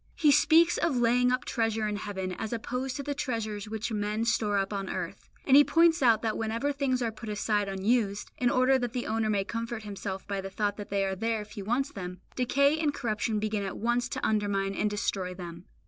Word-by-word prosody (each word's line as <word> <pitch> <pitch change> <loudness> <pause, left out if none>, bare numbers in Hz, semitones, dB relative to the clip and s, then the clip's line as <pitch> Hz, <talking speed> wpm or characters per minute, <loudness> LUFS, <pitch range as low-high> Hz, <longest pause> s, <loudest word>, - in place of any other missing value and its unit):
He 300 -3 +4
speaks 330 +4 +5
of 330 -6 +1
laying 245 +1 +3
up 255 -1 0
treasure 225 -2 0
in 210 -1 -2
heaven 190 -3 -4
as 215 +4 -5
opposed 250 +3 -3
to 285 - -4
the 290 +1 -2
treasures 220 -7 -3
which 220 +1 -3
men 210 +1 -1
store 210 -3 +1
up 195 +1 -1
on 195 -1 -3
earth; - - -5 0.2
and 270 - +5
He 290 - +9
points 330 +1 +4
out 230 -3 +4
that 220 -1 0
whenever 230 +5 -1
things 270 -3 0
are 230 - -1
put 220 0 -9
aside 205 -1 0
unused, 200 +1 0
in 245 - +3
order 255 +2 +3
that 245 -2 -3
the 250 -2 -2
owner 220 0 0
may 200 -2 +1
comfort 230 +1 -4
himself 200 -2 -6
by 200 -1 -2
the 195 - -6
thought 205 +1 -1
that 205 - -7
they 195 0 +1
are 190 0 -2
there 225 +2 -1
if 210 - -17
he 205 - -6
wants 245 +7 -1
them, 180 -2 -7 0.2
decay 280 +4 +2
and 300 -2 0
corruption 215 -2 -1
begin 210 0 -1
at 195 -1 -4
once 240 +2 0
to - - -3
undermine 200 -2 0
and 210 +2 0
destroy 190 -3 -2
them. 175 -1 -8
220 Hz, 225 wpm, -29 LUFS, 205-250 Hz, 0.2 s, He